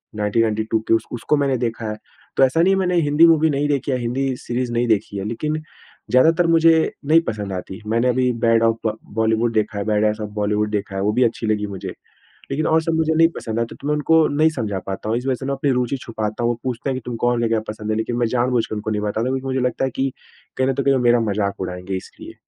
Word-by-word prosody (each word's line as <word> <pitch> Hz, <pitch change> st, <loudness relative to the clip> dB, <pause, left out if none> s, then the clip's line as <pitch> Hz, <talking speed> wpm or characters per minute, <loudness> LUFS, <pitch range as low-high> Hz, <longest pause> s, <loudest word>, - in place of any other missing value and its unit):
1992 110 Hz, +1 st, 0 dB
की -, -, +3 dB
उस 115 Hz, -, +2 dB
उसको 120 Hz, +4 st, 0 dB
मैंने 140 Hz, -2 st, +1 dB
देखा 115 Hz, -2 st, -3 dB
है। 105 Hz, -, -4 dB, 0.4 s
तो 135 Hz, -, +5 dB
ऐसा 135 Hz, +5 st, +3 dB
नहीं 190 Hz, +3 st, +4 dB
है 195 Hz, -, +1 dB
मैंने 180 Hz, -1 st, +1 dB
हिंदी 150 Hz, +2 st, +5 dB
मूवी 160 Hz, -1 st, +4 dB
नहीं 145 Hz, 0 st, 0 dB
देखी 140 Hz, -1 st, 0 dB
है 130 Hz, -, +1 dB
या -, -, -5 dB
हिंदी 130 Hz, +3 st, -1 dB
सीरीज़ 120 Hz, 0 st, -3 dB
नहीं 120 Hz, +1 st, +1 dB
देखी 105 Hz, -2 st, 0 dB
है। 95 Hz, -, -4 dB
लेकिन 150 Hz, +7 st, -2 dB, 0.6 s
ज़्यादातर 165 Hz, +7 st, +4 dB
मुझे 165 Hz, -1 st, +4 dB
नहीं 160 Hz, +3 st, +5 dB
पसंद 105 Hz, -3 st, -3 dB
आती। 95 Hz, +3 st, -6 dB
मैंने 115 Hz, +3 st, +1 dB
अभी 125 Hz, 0 st, +2 dB
बैड 115 Hz, 0 st, +4 dB
ऑफ़ 115 Hz, 0 st, +2 dB
बा 110 Hz, -, +1 dB, 0.2 s
बॉलीवुड 110 Hz, +1 st, +1 dB
देखा 110 Hz, -1 st, 0 dB
है, -, -, -1 dB
बैड 105 Hz, -1 st, +1 dB
एस 105 Hz, +1 st, 0 dB
ऑफ़ 105 Hz, -, -4 dB
बॉलीवुड 105 Hz, +1 st, 0 dB
देखा 105 Hz, -1 st, -3 dB
है। 95 Hz, -, -1 dB
वो 105 Hz, -, +2 dB
भी 125 Hz, +3 st, +3 dB
अच्छी 115 Hz, -1 st, -1 dB
लगी 105 Hz, -1 st, 0 dB
मुझे। 95 Hz, -2 st, -6 dB, 0.6 s
लेकिन 155 Hz, +3 st, -1 dB
और 160 Hz, 0 st, +3 dB
सब 165 Hz, 0 st, -1 dB
मुझे 160 Hz, 0 st, +1 dB
नहीं 165 Hz, +1 st, +6 dB
पसंद 110 Hz, 0 st, -3 dB
आई। 115 Hz, -, +1 dB
तो -, -, -11 dB
मैं 150 Hz, -, +2 dB
उनको 160 Hz, +1 st, +3 dB
नहीं 155 Hz, +3 st, +3 dB
समझा 105 Hz, -5 st, -2 dB
पाता 95 Hz, +2 st, -4 dB
हूँ। 115 Hz, -, +1 dB
इस 125 Hz, -, -5 dB
वज़ह 130 Hz, -, +2 dB
से 130 Hz, -, -6 dB
मैं 140 Hz, -, -1 dB
अपनी 135 Hz, +1 st, 0 dB
रूचि 125 Hz, +1 st, 0 dB
छुपाता 110 Hz, 0 st, -4 dB
हूँ। 120 Hz, -, +2 dB
वो 120 Hz, -, -5 dB
पूछते 130 Hz, +1 st, -3 dB
हैं 135 Hz, -, -1 dB
कि -, -, -6 dB
तुम 125 Hz, -, -4 dB
कौन 120 Hz, -1 st, +2 dB
ले 115 Hz, -, +2 dB
गया 115 Hz, -, +2 dB
पसंद 105 Hz, 0 st, -4 dB
है? 110 Hz, -, 0 dB
लेकिन 110 Hz, +2 st, -2 dB
मैं 120 Hz, -, +2 dB
जानबूझके 120 Hz, -1 st, 0 dB
उनको 105 Hz, +1 st, -3 dB
नहीं 105 Hz, -1 st, -1 dB
बताता। 105 Hz, +1 st, -2 dB
क्योंकि 130 Hz, 0 st, -2 dB
मुझे 130 Hz, 0 st, -1 dB
लगता 125 Hz, +1 st, 0 dB
है 130 Hz, -, -2 dB
कि 135 Hz, 0 st, 0 dB, 0.5 s
कहीं 130 Hz, 0 st, +2 dB
न 135 Hz, -, +1 dB
तो 140 Hz, -, -1 dB
कहीं 140 Hz, -, +3 dB
वो 130 Hz, -, +1 dB
मेरा 120 Hz, 0 st, +4 dB
मज़ाक 100 Hz, -1 st, -2 dB
उड़ाएँगे 90 Hz, +1 st, -4 dB
इसलिए। 95 Hz, -, -11 dB
120 Hz, 265 wpm, -21 LUFS, 110-135 Hz, 0.6 s, नहीं